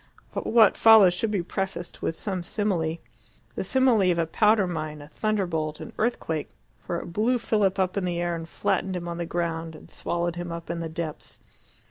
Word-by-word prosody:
What 220 -3 +4
follows 220 -5 +8
should 215 +5 -1
be 200 -4 0
prefaced 190 -1 -4
with 165 - -1
some 190 -1 -3
simile 175 -4 -1 0.6
the - - -3
simile 230 -3 +3
of 170 - 0
a 165 - +2
powder 210 +4 +3
mine, 155 -3 -4
a 145 - -11
thunderbolt, 165 -5 -1
an - - -8
earthquake 165 -9 -1 0.3
for 170 - -4
it 170 - -9
blew 230 +6 +2
Philip 210 -4 +1
up 185 -1 0
in 195 - 0
the 175 -1 -1
air 175 0 0
and 165 0 -7
flattened 190 +2 -1
him 175 -1 -4
on 170 0 -4
the 170 - -3
ground 165 -2 -3
and - - -14
swallowed 175 0 -2
him 175 -1 -4
up 170 0 -5
in 170 - -3
the 165 -1 -4
depths. 160 -2 -6
175 Hz, 195 wpm, -26 LUFS, 165-205 Hz, 0.6 s, follows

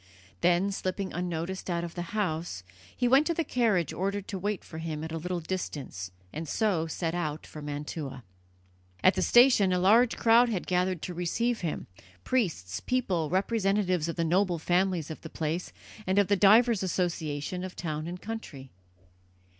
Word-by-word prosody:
Then, 180 +3 +3
slipping 190 0 -3
unnoticed 175 +2 -3
out 170 -1 -1
of 170 -1 -5
the 175 - -4 0.2
house, 160 - -2 0.3
he 245 - +2
went 270 +5 +5
to 335 - 0
the 330 - +1
carriage 215 - +1
ordered 200 +1 -2
to 195 - -3
wait 205 +1 -2
for 160 - -9
him 160 -2 -4
at 160 - -5
a 165 - -3
little 180 +2 -3
distance, 145 - -5 0.2
and 155 0 -5
so 190 -8 +1
set 165 +1 -2
out 155 -3 -3
for 155 - -10
Mantua. 145 -2 -5 0.8
At 185 - +7
the 185 - -1
station 240 -3 +6
a 180 - +2
large 225 +7 +4
crowd 235 +1 +5
had 200 -6 -2
gathered 180 -1 0
to 180 - -4
receive 225 +8 -1
him, 165 -4 -3 0.4
priests, 160 - -1
people, 185 -11 0
representatives 195 -3 +1
of 165 - -3
the 170 - 0
noble 180 +1 +2
families 175 -1 0
of 160 - -8
the 160 - -8
place, 160 +3 -3 0.4
and 190 +1 +1
of 205 -1 +4
the 200 - +5
divers 215 +3 +5
associations 175 -2 -2
of 185 -1 -6
town 155 -1 -4
and 180 +1 -6
country. 165 - -7
180 Hz, 175 wpm, -29 LUFS, 160-200 Hz, 0.8 s, At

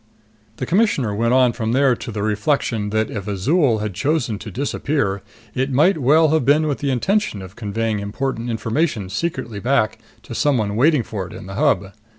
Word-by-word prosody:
The 130 - -4
Commissioner 165 - +1
went 115 +3 +1
on 125 -2 +4
from 110 0 -2
there 135 -1 +4
to 120 - -7
the 105 -1 -3
reflection 110 0 0
that 110 +1 0
if 100 -2 -5
Azol 115 - +1
had 105 -2 -3
chosen 125 - -1
to 105 - -8
disappear, 110 - -1 0.3
it 130 +2 -1
might 155 +7 +3
well 155 +4 +4
have 160 -2 +2
been 145 +4 +3
with 145 -3 -1
the 140 - -1
intention 190 - 0
of 95 +2 -11
conveying 110 0 -2
important 115 +4 -3
information 115 - -1
secretly 120 - -3
back 115 -1 +1 0.2
to - - -9
somebody 120 -8 +1
waiting 135 +5 +3
for 100 -5 -5
it - - -12
in - - -9
the 95 - -8
Hub. 105 -6 +1
120 Hz, 185 wpm, -20 LUFS, 105-145 Hz, 0.3 s, on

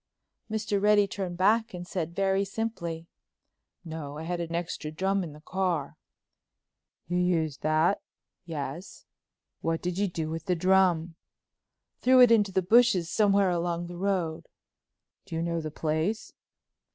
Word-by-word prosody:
Mr. 210 -2 -1
Reddy 210 0 +5
turned 190 -3 -5
back 215 +2 +2
and 175 0 -6
said 170 -2 -4
very 195 0 +2
simply: 190 -6 -4 0.8
"No, 155 -3 -6
I 155 - -6
had 175 +1 -3
an 170 0 -3
extra 170 -2 -3
drum 190 +5 0
in 165 - -6
the 150 - -14
car." 180 -4 -2 1.1
"You 175 +2 0
used 165 -5 0
that?" 155 +5 +2 0.4
"Yes." 160 +1 -6 0.5
"What 165 0 -1
did 180 +1 -2
you 205 - +2
do 160 -3 -4
with 165 0 -5
the 180 -2 +1
drum?" 180 -2 +3 0.9
"Threw 255 0 +5
it 245 -2 +8
into 210 -4 +4
the 190 0 +1
bushes 195 -4 +4
somewhere 200 -3 +3
along 175 0 -1
the 175 0 -8
road." 180 -4 -1 0.8
"Do 170 - -6
you 165 - -1
know 170 -1 -1
the 155 - -4
place?" 160 +8 -2
175 Hz, 150 wpm, -28 LUFS, 165-195 Hz, 1.1 s, it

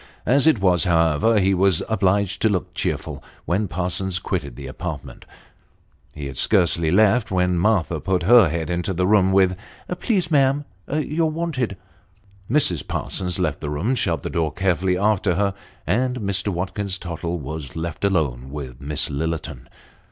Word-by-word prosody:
As 135 +6 +3
it 155 -9 +4
was, 90 -1 +3
however, 85 +5 +3
ho 95 0 +2
was 95 -2 +3
obliged 100 -2 +1
to 110 - +3
look 95 -4 -2
cheerful - - -3 0.2
when 100 +4 0
Parsons 90 +1 -2
quitted 80 -7 -4
the 70 - -9
apartment. 75 +2 -7 0.9
He 75 -2 -6
had 70 -2 -6
scarcely 85 -5 +3
left, 110 +5 +3
when 90 -2 +1
Martha 90 -5 +1
put 90 +1 -1
her 110 -2 +6
head 80 0 -3
into 90 +2 -2
the 90 +1 +1
room, 95 -1 +4
with 95 -1 +3 0.2
" 180 - -7
Please, 185 -8 0
ma'am, 140 0 +3 0.3
you're 155 +2 0
wanted." 155 - -2 0.7
Mrs. 90 - +2
Parsons 90 -2 -2
left 80 -6 -1
the 75 - -4
room, 80 - -1
shut 85 - -1
the - - -4
door 80 -2 0
carefully 90 -1 0
after 100 -2 +1
her, 100 +1 +1 0.3
and 125 +7 0
Mr. 100 0 0
Watkins 95 +1 -2
Tottle 85 -1 -4
was 75 -1 -7
left 85 +3 -5
alone 70 -10 0
with 65 -4 -8
Miss 75 +1 +1
Lillerton. 80 -2 -4
95 Hz, 160 wpm, -22 LUFS, 80-105 Hz, 0.9 s, her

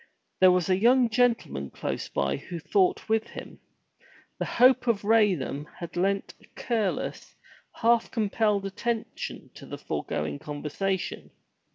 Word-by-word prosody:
There 185 - +7
was 180 -2 +1
a 185 0 +2
young 240 +1 +4
gentleman 220 - +1
close - - -4
by 70 -1 -1
who 175 - -7
thought 185 +3 +1
with 220 0 +1
him. - - -10 0.8
The - - -1
hope 255 +1 +4
of 215 -4 +1
Raynham 195 -10 +2
had 170 - -8
lent 195 +2 0
a - - -18
careless, 220 -5 -2 0.4
half 235 0 +2
compelled 210 -2 0
attention 225 +4 -4
to - - -12
the - - -6
foregoing 75 -1 -3
conversation. 155 +6 -3
200 Hz, 135 wpm, -27 LUFS, 175-230 Hz, 0.8 s, There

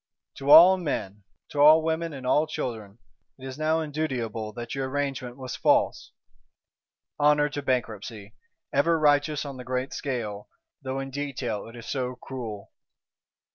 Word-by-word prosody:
To 140 +1 -4
all 175 +5 +10
men, 105 - -4 0.2
to 145 - -5
all 155 +2 +8
women 165 +1 -1
and 135 -3 -8
all 150 +4 +3
children, 115 -9 -5 0.4
it 130 - -11
is 130 +2 -7
now 160 +1 +1
indutiable 125 -8 -3
that 120 +1 -6
your 135 0 -2
Arrangement 135 -3 -3
was 130 -2 -6
false. - - +1 1.1
Honour 150 0 +4
to 145 0 -4
Bankruptcy; 110 -5 -3 0.4
ever 165 +4 +3
righteous 145 -1 +2
on 140 -2 -7
the 125 - -8
great 130 +1 -3
scale, 110 -7 -4 0.3
though 135 0 -3
in 135 0 -5
detail 130 -7 -4
it 115 - -12
is 120 -1 -10
so 125 -2 -3
cruel! 120 -6 -7
135 Hz, 150 wpm, -26 LUFS, 120-150 Hz, 1.1 s, all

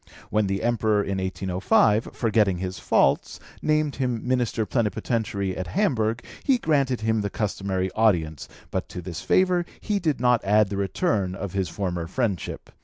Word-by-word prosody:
When 105 -1 +2
the 95 +2 -2
Emperor, 110 -3 +2
in 95 -1 -2
1805, 95 +4 +2
forgetting 105 -5 +2
his 90 +1 -4
faults, - - +2 0.2
named 155 -1 +1
him 125 -3 -2
Minister 120 -3 +1
Plenipotentiary 105 -4 -1
at 95 - -4
Hamburg, 120 - 0 0.2
he 270 -2 +3
granted 140 - +1
him 110 0 +1
the 100 - -2
customary 95 -3 -2
audience, 85 -10 +1 0.2
but - - -3
to 90 - -7
this 85 -1 -6
favour 180 -1 +3 0.2
he 210 -2 -1
did 155 -7 0
not 125 -1 +3
add 105 0 +3
the 100 - -3
return 100 - 0
of 95 -2 -5
his 95 -2 -1
former 90 -4 -3
friendship. 100 -2 -3
105 Hz, 160 wpm, -25 LUFS, 95-125 Hz, 0.2 s, he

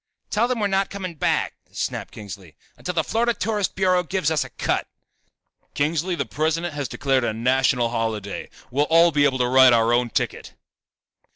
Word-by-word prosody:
"Tell 225 +3 +2
them 250 -2 -1
we're 210 - +1
not 195 0 +1
coming 190 -3 -5
back," 155 - 0 0.2
snapped - - -4
Kingsley, 95 -6 -10 0.2
"until 180 - -5
the 160 - +2
Florida 235 +4 0
Tourist 210 -2 -1
Bureau 185 -1 +2
gives 180 -3 -1
us 155 - +1
a - - -10
cut." - - -2 0.9
"Kingsley, 160 +5 0
the - - -2
President 160 +2 -1
has 145 -2 -3
declared 135 -2 0
a 115 - 0
national 125 +1 +2
holiday. 110 -4 -3 0.2
We'll 145 +4 +2
all 165 +1 +6
be 145 -1 +3
able 135 -2 +2
to 125 -1 +1
write 130 0 +6
our 115 0 +3
own 120 0 +2
ticket." - - -3
150 Hz, 180 wpm, -23 LUFS, 125-180 Hz, 0.9 s, all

